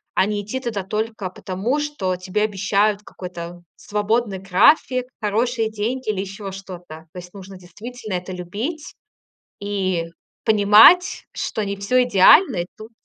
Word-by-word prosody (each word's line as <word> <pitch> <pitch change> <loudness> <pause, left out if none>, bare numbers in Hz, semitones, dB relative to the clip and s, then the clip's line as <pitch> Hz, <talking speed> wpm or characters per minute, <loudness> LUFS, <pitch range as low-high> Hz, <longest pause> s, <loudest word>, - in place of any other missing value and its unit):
а - - +3
не 205 0 -2
идти 235 +6 -4
туда 220 -6 -4
только 215 -1 -3
потому, 195 +10 -3
что 290 -12 -2
тебе 185 +3 -2
обещают 205 0 +1
какой-то 175 -2 -9
свободный 210 0 -1
график, 245 - +3
хорошие 225 +2 0
деньги 225 +3 -3
или 195 - -4
ещё 195 0 -7
что-то. 175 -4 -10
То - - -11
есть 180 +1 -12
нужно 195 -1 -11
действительно 215 +4 -9
это 180 +1 -5
любить 215 - -5 0.7
и 190 -4 -2 0.4
понимать, 220 - +6
что 215 - -3
не 200 0 -3
всё 250 +6 +2
идеально, 245 - +5
и 175 - -1
тут 220 +2 -11
205 Hz, 145 wpm, -21 LUFS, 185-225 Hz, 0.7 s, понимать